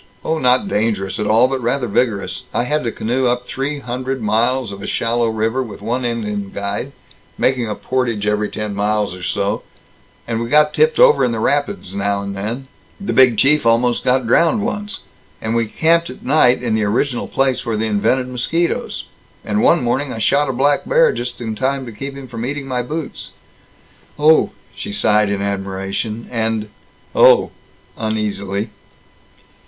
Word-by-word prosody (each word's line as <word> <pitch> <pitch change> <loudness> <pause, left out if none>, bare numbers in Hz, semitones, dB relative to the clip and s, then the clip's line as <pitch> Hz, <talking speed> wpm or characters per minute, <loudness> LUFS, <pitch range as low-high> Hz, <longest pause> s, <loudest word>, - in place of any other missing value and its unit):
Oh, 160 0 0
not 125 +7 +3
dangerous 105 - -1
at 105 - -1
all, 115 +4 +5
but 135 0 -2
rather 125 +2 0
vigorous. 100 -5 -1
I - - +2
had 150 +4 -1
to 115 - 0
canoe 125 +4 0
up 125 0 0
three 140 +3 -3
hundred 130 +2 -3
miles 115 +2 +1
of 100 0 -8
a - - -6
shallow 115 0 0
river, 110 +4 0
with 110 -6 -7
one 120 +5 -2
Indian 105 -4 -2
guide, 100 0 -4 0.4
making 125 -3 +1
a 105 - -3
portage 120 -5 -1
every 105 0 0
ten 105 -1 -4
miles 105 -1 0
or 90 - -11
so, 100 +3 -1 0.7
and 115 -1 -1
we 115 - -3
got 150 +2 +4
tipped 470 +1 +3
over - - +6
in 120 - +2
the 115 - -2
rapids 145 - -1
now 100 0 -1
and 100 0 -5
then 115 +7 -4 0.3
the 200 - -3
Big 130 -4 +5
Chief 150 +6 +4
almost 120 +1 +2
got 130 0 +2
drowned 170 - +3
once 210 -3 -4 0.4
and 110 +1 -2
we 115 -1 +1
camped 165 +8 +2
at 125 - -11
night 130 -3 +4
in 115 -3 0
the 110 0 +1
original 120 +5 0
place 135 -1 0
where 115 -3 -2
they 110 - 0
invented 110 +5 +1
mosquitoes 160 +7 -2 0.4
and 105 0 0
one - - +4
morning 130 +3 0
I - - -5
shot 140 +6 +2
a - - +2
black 140 +3 +2
bear - - +4
just 125 0 -5
in 110 -2 -3
time 135 +4 -1
to 120 - -7
keep 135 +6 -7
him 135 -1 -9
from 115 -2 -6
eating 140 +2 -3
my 130 -2 -1
boots." 150 +5 -6 0.8
"Oh!" 155 +2 +5 0.2
she 100 - -6
sighed 105 0 +3
in 100 0 -1
admiration, 100 +3 -3
and 110 -2 -1 0.4
"Oh!" - - +6 0.5
again, 110 0 -1
uneasily. 100 -1 -2
120 Hz, 180 wpm, -18 LUFS, 105-135 Hz, 0.8 s, over